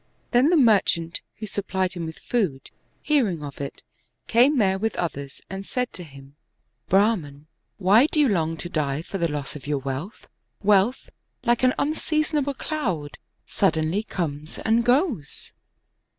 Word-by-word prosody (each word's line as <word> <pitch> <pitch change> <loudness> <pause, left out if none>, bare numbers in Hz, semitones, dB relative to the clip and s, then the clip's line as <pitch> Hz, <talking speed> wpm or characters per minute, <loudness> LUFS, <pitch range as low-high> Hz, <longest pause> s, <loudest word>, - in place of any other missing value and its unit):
Then 250 +5 +5
the 350 - +4
merchant, 195 - +3 0.2
who 215 - -5
supplied 190 -2 -2
him 170 -2 -4
with 160 - -8
food, 185 - -2 0.3
hearing 220 - +1
of 145 -1 -7
it, 140 - -6 0.4
came 255 +5 +4
there 190 -4 +2
with 220 0 -1
others, 140 -5 -4
and 195 +1 -6
said 250 +4 -3
to 180 - -6
him, 140 -2 -14 0.3
" - - -45
Brahman, 180 -8 +2 0.3
why 205 +8 +5
do 310 - -1
you 295 - +5
long 165 -6 0
to 160 - -5
die 150 -3 -1
for 195 - -5
the 170 - +2
loss 145 -1 -4
of 145 -1 -9
your 145 -1 +1
wealth? 140 +8 -5 0.4
Wealth, 205 +5 +3 0.3
like 240 0 +2
an 255 0 +3
unseasonable 305 -1 0
cloud, 190 - -3 0.3
suddenly 160 +6 +1
comes 155 -7 -4
and 225 +1 +2
goes." 245 - 0
190 Hz, 155 wpm, -24 LUFS, 155-240 Hz, 0.4 s, Then